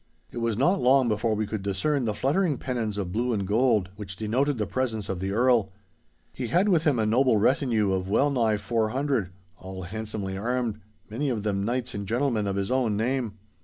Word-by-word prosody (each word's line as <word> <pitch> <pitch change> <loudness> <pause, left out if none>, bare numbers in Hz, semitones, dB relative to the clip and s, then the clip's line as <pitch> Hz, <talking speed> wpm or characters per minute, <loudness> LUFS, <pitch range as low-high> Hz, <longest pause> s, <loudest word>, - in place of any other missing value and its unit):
It 120 - -5
was 115 -2 -1
not 180 +10 +2
long 130 0 +4
before 110 0 0
we 110 +1 -1
could 110 0 -4
discern 110 +8 0
the 105 -2 -1
fluttering 150 - +1
pennons 115 -5 -3
of 95 -3 -3
blue 120 +4 0
and 100 -3 -1
gold, 105 -2 +2
which 95 -2 -7
denoted 125 +7 0
the 105 - -1
presence 110 0 -2
of 95 -2 -2
the 95 +1 -2
Earl. 115 -2 +3 0.6
He 125 - -4
had 180 - +2
with 170 -4 +3
him 145 -5 +3
a 110 - +1
noble 120 +1 +3
retinue 115 -3 +2
of 95 0 -1
well 140 +8 +3
nigh 115 -5 +2
four 110 +2 0
hundred—all 95 -8 -4
handsomely 105 0 -5
armed—many 110 +3 -3
of 110 -5 -2
them 100 -2 -1
knights 120 +3 -2
and 100 -1 -5
gentlemen 115 -2 0
of 100 - -1
his 100 +3 -2
own 125 -5 +1
name. 120 -1 -1
110 Hz, 200 wpm, -26 LUFS, 100-130 Hz, 0.6 s, long